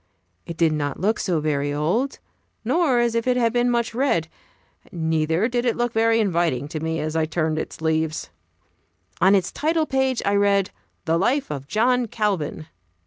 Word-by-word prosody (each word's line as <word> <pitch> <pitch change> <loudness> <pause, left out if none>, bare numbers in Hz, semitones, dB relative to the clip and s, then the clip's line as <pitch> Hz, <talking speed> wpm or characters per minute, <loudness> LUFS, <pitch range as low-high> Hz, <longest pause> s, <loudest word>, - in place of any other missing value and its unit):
It 170 - -6
did 165 -2 +3
not 145 -2 -3
look 210 +4 +1
so 175 -5 0
very 145 -2 -1
old, 175 - -1 0.5
nor 275 +1 +2
as 240 -1 +2
if 230 +1 -1
it 250 0 +2
had 230 -2 +2
been 245 0 +2
much 235 -1 0
read; 225 - 0 0.6
neither 160 +3 0
did 240 -1 -1
it 240 -2 0
look 240 -1 -1
very 225 0 +3
inviting 170 - 0
to 155 - -4
me 160 +1 -2
as 155 +1 -3
I 160 -1 +2
turned 155 -1 -1
its - - -7
leaves. 160 - -1 0.9
On 190 +3 +6
its 190 -2 0
title 315 +1 0
page 265 -3 0
I 200 - +2
read 200 -1 +2 0.3
"The 165 0 +1
Life 260 - 0
of 140 -2 -6
John 240 - +2
Calvin." 195 -9 -2
195 Hz, 180 wpm, -23 LUFS, 160-240 Hz, 0.9 s, On